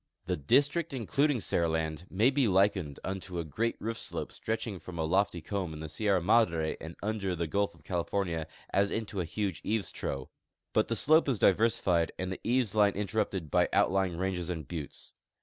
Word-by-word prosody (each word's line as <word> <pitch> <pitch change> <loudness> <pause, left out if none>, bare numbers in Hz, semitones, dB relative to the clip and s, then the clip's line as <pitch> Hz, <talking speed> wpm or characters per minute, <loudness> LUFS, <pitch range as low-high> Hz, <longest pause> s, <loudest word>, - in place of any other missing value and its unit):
The - - 0
district 145 - +2
including 140 +3 +1
Seriland 80 -2 -1
may' 110 +8 +3
be 135 -3 +2
likened 95 -6 +2
unto 95 -1 -4
a 85 - -1
great 110 +10 -1
roof 115 +2 -3
slojie - - -4
stretching 110 -3 -3
from 85 +1 -9
a 80 -1 0
lofty^ 90 -2 +1
comb 95 -5 -2
in - - -8
the 80 0 -6
Sierra 100 +1 +1
Madre 85 -5 +2
to - - -14
and 80 +1 -7
under 100 -3 -1
the 85 0 -1
gulf 100 +4 0
of - - -21
California 85 -2 -1 0.2
as 100 +1 +3
into 105 -2 -3
a - - -2
huge 100 +3 -3
eaves 110 -1 -1
trough; 65 -1 -4 0.4
but - - +3
the - - -1
slope 155 0 +4
is 130 - +1
diversified 100 -5 +3
and 95 0 -3
the - - -9
eaves 120 -3 +1
line 105 -2 +4
interrupted 95 -5 -2
b.y - - +4
outlying 95 -3 +2
ranges 90 -1 -2
and 80 -5 -4
buttes. 80 -5 -7
95 Hz, 190 wpm, -30 LUFS, 85-110 Hz, 0.4 s, slope